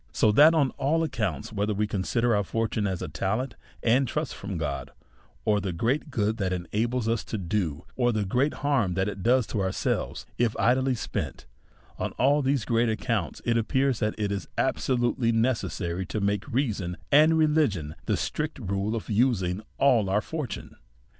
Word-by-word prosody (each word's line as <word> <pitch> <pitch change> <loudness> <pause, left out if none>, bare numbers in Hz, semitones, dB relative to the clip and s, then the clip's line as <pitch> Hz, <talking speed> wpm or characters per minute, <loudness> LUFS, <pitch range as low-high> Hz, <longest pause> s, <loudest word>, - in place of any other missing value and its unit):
So 110 - +3
that, 150 +9 +7
on 140 -5 +3
a!i 160 +4 +2
accounts, 110 - -3
whether 105 0 0
we 105 +2 +1
consider 110 +3 0
our 105 - +2
fortune 110 0 -1
as 95 -2 -3
a - - -3
talent 110 - -2 0.3
and 125 +3 +3
trust 150 +2 -2
from 100 -2 -5
God, 75 -3 -3 0.6
or 105 -1 +2
the 95 - -2
great 120 - -1
good 110 -4 0
tliat 100 -4 -1
it 90 - -1 0.2
enables 115 +2 0
us 115 -1 0
to 110 - -4
do, 85 -4 -2
or 120 -1 +2
the 105 -2 -1
great 130 +9 +1
harm 115 -11 +2
that 95 +1 +1
it 100 -2 -5
does 125 +3 +3
to 105 - -2
ourselves, 95 0 -1
if 120 -2 +2
idly 130 +2 +2
spent; 110 - -4 0.5
on - - -2
all 140 +3 +3
these 135 -4 +1
great 115 0 +2
ac 110 - 0
counts, 115 -8 -1
it 115 -1 +2
appears 130 +2 +1
that 105 0 0
it 105 -2 -1
is 100 -1 -3
absolutely 120 -2 +1
necessary 110 -6 0
to 110 - -3
make 100 0 -1
reason 105 -9 -1
and 155 +3 +6
religion 150 - +2
the - - +2
strict 150 0 -3
rule 100 -1 -2
of 115 - -5
using 105 -5 +1 0.2
all 120 -8 +4
our 100 +2 +2
fortune. 150 -5 -6
115 Hz, 185 wpm, -27 LUFS, 100-130 Hz, 0.6 s, that